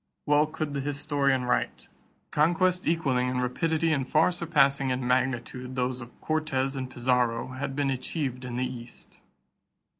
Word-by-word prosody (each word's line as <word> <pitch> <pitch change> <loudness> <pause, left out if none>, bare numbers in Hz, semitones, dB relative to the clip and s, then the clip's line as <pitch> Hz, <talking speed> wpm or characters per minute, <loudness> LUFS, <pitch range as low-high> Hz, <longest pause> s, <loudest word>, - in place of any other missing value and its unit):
Well 150 +1 +4
could 155 -1 -4
the 140 - -1
historian 140 -2 0
write: 125 - -1 0.4
"Conquests 180 +4 +2
equaling 135 -7 +1
in 125 0 -1
rapidity 160 +6 +1
and 135 -3 -1
far 155 +3 +4
surpassing 140 -6 +2
in 125 0 -1
magnitude 125 0 -1
those 125 0 -1
of 120 +1 -12
Cortes 145 -4 0
and 130 -1 -4
Pizarro 120 -1 +1
had 135 +1 -4
been 140 -1 +1
achieved 130 -1 -3
in 125 -1 -5
the 125 +1 0
East." 120 -1 -10
135 Hz, 150 wpm, -27 LUFS, 125-150 Hz, 0.4 s, Well